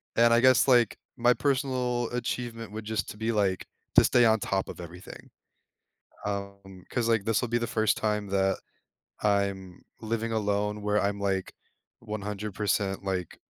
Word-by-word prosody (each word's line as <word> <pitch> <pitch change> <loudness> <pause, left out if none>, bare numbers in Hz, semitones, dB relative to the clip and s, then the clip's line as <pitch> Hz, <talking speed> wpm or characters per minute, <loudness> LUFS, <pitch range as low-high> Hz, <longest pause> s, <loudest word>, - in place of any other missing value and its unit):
And 115 0 +5
I 115 - +5
guess, 130 +2 +5
like, 120 -4 +4 0.2
my 120 +1 +4
personal 125 -3 0
achievement 120 -2 -4
would 110 0 -7
just 110 -2 -2
to - - -8
be, 110 +2 -1
like, 100 -4 0 0.3
to - - +8
stay 120 -1 +4
on 110 -1 +4
top 95 -1 -1
of - - -8
everything, 90 +2 -11 1.0
um, 100 -2 -6
'cause, 120 -2 0
like, 115 -3 +2
this 110 -1 +2
will 125 - -2
be 120 - +2
the 115 0 -2
first 110 -2 +1
time 105 -1 -1
that 95 0 +1 0.6
I'm 100 -3 0 0.2
living 115 0 -2
alone 105 -1 -1
where 105 0 +1
I'm, 100 0 -1
like, 95 -2 -1 0.5
100% 105 -2 -2
like 95 -3 -3
105 Hz, 160 wpm, -28 LUFS, 100-115 Hz, 1.0 s, to